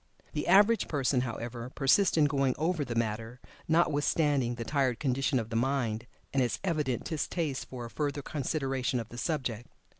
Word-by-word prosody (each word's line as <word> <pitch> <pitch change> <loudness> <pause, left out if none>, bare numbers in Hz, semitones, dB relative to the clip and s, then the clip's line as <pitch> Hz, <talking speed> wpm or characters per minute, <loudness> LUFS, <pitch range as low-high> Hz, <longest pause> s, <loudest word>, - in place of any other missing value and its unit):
The 150 - -2
average 205 +5 +5
person, 135 -3 +1
however, 120 0 -5
persists 150 +8 +3
in 155 - +6
going 135 -3 +1
over 160 0 0
the 120 -4 -4
matter, 115 +1 -2 0.3
notwithstanding 145 -5 +2
the 120 - -4
tired 130 -1 0
condition 135 -1 +1
of 115 -1 -3
the - - -3
mind, 120 -2 0 0.3
and 135 - +3
its 120 -2 0
evident 150 - 0
distaste 155 -3 -2
for 125 -2 -6
a - - -7
further 145 -1 -2
consideration 135 -3 -1
of 115 -1 -6
the 120 - -8
subject. 125 -7 -2
135 Hz, 170 wpm, -30 LUFS, 120-150 Hz, 0.3 s, in